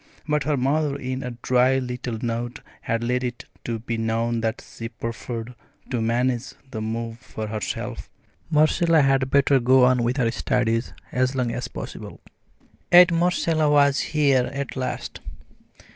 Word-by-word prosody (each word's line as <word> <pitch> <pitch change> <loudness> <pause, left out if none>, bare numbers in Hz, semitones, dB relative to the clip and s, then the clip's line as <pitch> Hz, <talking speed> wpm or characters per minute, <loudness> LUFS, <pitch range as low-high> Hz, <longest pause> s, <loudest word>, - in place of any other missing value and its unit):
But 150 -1 0
her 150 -2 +1
mother 140 +2 +1
in 130 -1 -4
a 125 -2 -6
dry 130 +1 +3
little 125 -2 -4
note 120 +1 -3 0.2
had 115 0 -1
let 125 +2 0
it 120 -1 -4 0.4
be 115 -1 -2
known 115 +1 0
that 110 0 -2
she 115 0 -7
preferred 115 +1 -6 0.4
to 120 -3 0
manage 120 +2 0 0.2
the 110 - -4
move 115 +1 -4
for 110 - -6
herself. 105 -2 -4 0.4
Marcella 155 +1 +4
had 135 -1 +2
better 140 0 +4
go 130 +1 +5
on 125 -1 +3
with 120 +3 0
her 115 -4 +2
studies 120 -2 0 0.2
as 130 +1 +1
long 125 -3 0
as 125 +1 -4
possible. - - -8 0.7
Yet 175 0 +9
Marcella 165 -2 +2
was 140 -1 +4
here 140 -5 +2
at 140 0 -4
last. 130 -1 -4
125 Hz, 150 wpm, -24 LUFS, 115-140 Hz, 0.7 s, Yet